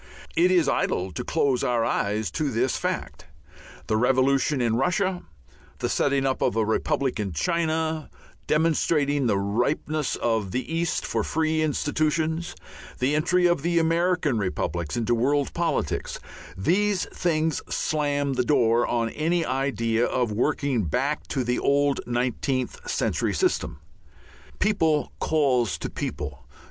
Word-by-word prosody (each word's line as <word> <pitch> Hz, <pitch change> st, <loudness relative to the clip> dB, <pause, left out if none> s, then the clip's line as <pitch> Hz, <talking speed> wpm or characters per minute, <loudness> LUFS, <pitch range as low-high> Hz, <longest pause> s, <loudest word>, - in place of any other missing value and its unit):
It 175 Hz, +3 st, +4 dB
is 180 Hz, -3 st, +3 dB
idle 95 Hz, +1 st, 0 dB
to 80 Hz, -, -4 dB
close 140 Hz, -5 st, +1 dB
our 120 Hz, -2 st, +1 dB
eyes 105 Hz, +2 st, -1 dB
to 155 Hz, -3 st, -1 dB
this 125 Hz, +1 st, 0 dB
fact. -, -, -4 dB, 0.6 s
The 110 Hz, -, +1 dB
revolution 135 Hz, +4 st, +2 dB
in 115 Hz, -2 st, +1 dB
Russia, 180 Hz, -, 0 dB, 0.6 s
the -, -, -2 dB
setting 140 Hz, -1 st, +1 dB
up 130 Hz, -1 st, 0 dB
of -, -, +1 dB
a 110 Hz, -1 st, +2 dB
republic 125 Hz, +4 st, 0 dB
in 100 Hz, -4 st, -2 dB
China, 160 Hz, -, -1 dB, 0.4 s
demonstrating 150 Hz, -3 st, +2 dB
the 100 Hz, -, +2 dB
ripeness 125 Hz, +9 st, -1 dB
of 110 Hz, -4 st, 0 dB
the 130 Hz, -, -3 dB
East 170 Hz, 0 st, -1 dB
for 115 Hz, -2 st, -1 dB
free 160 Hz, +3 st, 0 dB
institutions, 155 Hz, +2 st, 0 dB, 0.4 s
the 130 Hz, +3 st, +1 dB
entry 175 Hz, +4 st, +2 dB
of 175 Hz, -4 st, +3 dB
the 170 Hz, +2 st, 0 dB
American 165 Hz, -5 st, +2 dB
republics 85 Hz, -4 st, -2 dB
into 120 Hz, 0 st, +1 dB
world 140 Hz, +4 st, +1 dB
politics 170 Hz, -, -1 dB, 0.4 s
these 190 Hz, -, +1 dB
things 160 Hz, -3 st, 0 dB
slam 145 Hz, -2 st, 0 dB
the 125 Hz, -1 st, +1 dB
door 120 Hz, -4 st, +3 dB
on 115 Hz, -1 st, 0 dB
any 165 Hz, +2 st, 0 dB
idea 125 Hz, -4 st, 0 dB
of 125 Hz, -3 st, 0 dB
working 125 Hz, 0 st, 0 dB
back 135 Hz, -, -1 dB
to 130 Hz, -, -1 dB
the 125 Hz, +1 st, 0 dB
old 140 Hz, 0 st, +2 dB
nineteenth 125 Hz, +1 st, -2 dB
century -, -, 0 dB
system. 370 Hz, -1 st, 0 dB, 0.8 s
People 160 Hz, -8 st, +1 dB
calls 130 Hz, -8 st, +1 dB
to -, -, -5 dB
people. -, -, -5 dB
140 Hz, 135 wpm, -25 LUFS, 120-160 Hz, 0.8 s, It